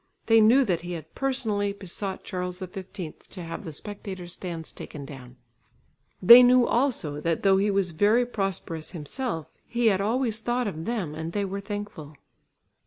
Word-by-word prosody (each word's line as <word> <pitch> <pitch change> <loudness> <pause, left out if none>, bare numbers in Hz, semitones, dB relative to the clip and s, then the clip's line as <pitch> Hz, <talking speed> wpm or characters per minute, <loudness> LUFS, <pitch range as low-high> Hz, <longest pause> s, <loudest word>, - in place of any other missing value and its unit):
They 225 -1 +6
knew 250 +5 +6
that 180 -6 0
he 175 +1 -5
had 160 -2 -8
personally 220 -7 -1
besought 195 0 -5
Charles 180 -1 -4
XV 185 0 -8 0.4
to 180 - -8
have 165 +3 -6
the 165 - -6
spectators' 190 0 -8
stands 170 -4 -6
taken 145 -2 -9
down; 130 -4 -11 0.9
they 235 +6 +11
knew 250 0 +6
also, 235 - 0
that 165 0 -1
though 195 -1 +5
he 200 +2 +2
was 195 -3 +1
very 210 +9 +3
prosperous 195 -8 -3
himself, 165 - -4 0.2
he 235 -1 +2
had 190 - -1
always 225 +1 0
thought 240 +2 -1
of 165 -6 -4
them 205 -9 -2
and 160 +2 -5
they 205 -1 0
were 195 +1 -4
thankful. 205 -8 -7
195 Hz, 170 wpm, -26 LUFS, 165-225 Hz, 0.9 s, they